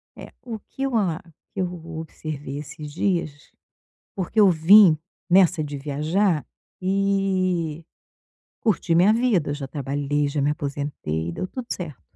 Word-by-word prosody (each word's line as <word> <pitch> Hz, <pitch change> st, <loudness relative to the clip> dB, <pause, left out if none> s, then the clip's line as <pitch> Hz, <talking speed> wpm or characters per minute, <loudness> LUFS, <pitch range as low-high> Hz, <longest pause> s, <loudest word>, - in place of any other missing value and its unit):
É. -, -, -11 dB
O 230 Hz, -3 st, -6 dB
que 270 Hz, -, -7 dB
eu 270 Hz, -3 st, 0 dB
a 180 Hz, -7 st, +1 dB, 0.3 s
que 200 Hz, -, -6 dB
eu 180 Hz, -1 st, -2 dB, 0.2 s
observei 150 Hz, -3 st, -6 dB
esses 150 Hz, 0 st, -8 dB
dias, 165 Hz, -5 st, -2 dB, 0.6 s
porque 190 Hz, +3 st, -4 dB
eu 205 Hz, -3 st, +7 dB
vim 175 Hz, +1 st, +7 dB, 0.3 s
nessa 175 Hz, -4 st, +5 dB
de 145 Hz, -1 st, -5 dB
viajar, 155 Hz, +5 st, 0 dB, 0.4 s
e 185 Hz, -4 st, 0 dB, 0.8 s
curtir 185 Hz, -6 st, +1 dB
minha 180 Hz, +5 st, +6 dB
vida. 225 Hz, -10 st, +2 dB
Eu -, -, -1 dB
já 140 Hz, -2 st, -6 dB
trabalhei, 145 Hz, +1 st, -1 dB
já 145 Hz, 0 st, -2 dB
me 140 Hz, +1 st, +2 dB
aposentei. 140 Hz, -, -3 dB
Deu 185 Hz, -, -4 dB
tudo 250 Hz, +5 st, -7 dB
certo. 160 Hz, -8 st, -7 dB
165 Hz, 145 wpm, -24 LUFS, 145-195 Hz, 0.8 s, eu